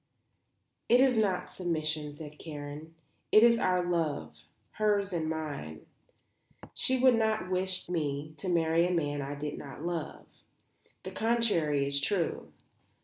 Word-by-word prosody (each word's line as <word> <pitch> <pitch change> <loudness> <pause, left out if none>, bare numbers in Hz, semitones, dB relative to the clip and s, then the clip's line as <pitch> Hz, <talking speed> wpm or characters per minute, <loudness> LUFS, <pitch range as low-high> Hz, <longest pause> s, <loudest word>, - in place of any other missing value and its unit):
"It 245 - +6
is 260 -1 +5
not 200 -5 0
submission," 155 -4 -2
said 150 -1 -10
Karen. 150 +1 -8 0.4
"It 215 - +7
is 235 -1 +6
our 180 -3 +1
love, 145 - -2 0.3
hers 205 -2 +1
and 160 -2 -1
mine. 145 - -5 0.9
She 260 - +2
would 255 0 +6
not 220 -4 0
wish 185 0 0
me 155 -3 -2
to 190 - -4
marry 165 0 +3
a - - -1
man 145 -4 -1
I 140 +1 -4
did 145 +1 -5
not 145 +3 -8
love. 170 -3 -4 0.8
The 185 - -6
contrary 190 -11 +1
is 140 0 0
true. 175 +1 -1
165 Hz, 140 wpm, -30 LUFS, 150-190 Hz, 0.9 s, It